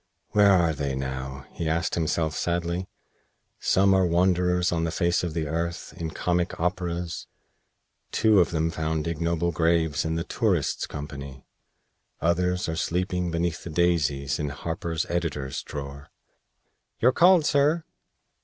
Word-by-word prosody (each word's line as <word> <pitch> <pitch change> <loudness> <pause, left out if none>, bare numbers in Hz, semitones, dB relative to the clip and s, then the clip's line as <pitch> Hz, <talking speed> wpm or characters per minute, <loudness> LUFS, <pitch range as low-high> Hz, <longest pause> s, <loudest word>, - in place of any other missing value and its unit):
"Where 105 -1 +5
are 85 -4 +4
they 70 -2 -2
now?" 65 0 -5
he 80 - -3
asked 85 +1 0
himself, 80 -1 0
sadly. 85 +1 -1 0.7
"Some 95 +1 +3
are 95 0 +4
wanderers 90 0 +2
on 85 -1 0
the 85 - 0
face 85 +1 +1
of 85 -3 -3
the 80 -2 -1
earth, 85 +3 -3
in 80 -1 -4
comic 90 +2 -1
operas. 90 -1 -2 0.8
Two 110 -3 +4
of 90 - +4
them 80 0 0
found 80 -1 -2
ignoble 85 +1 0
graves 80 -2 +1
in 80 0 -1
the 85 - -1
'Tourists'' - - 0
company. 70 -2 -8 0.7
Others 90 +2 +1
are 80 - -2
sleeping 90 +2 -1
beneath 85 -1 -2
the - - -6
daisies 75 -5 +1
in 75 -1 -1
Harper's 80 +2 -3
'Editor's 75 -6 -2
Drawer.'" 70 -1 -7 0.9
"You're 125 - +5
called, 175 +2 +5
sir!" 150 +4 +3
85 Hz, 140 wpm, -26 LUFS, 75-90 Hz, 0.9 s, Where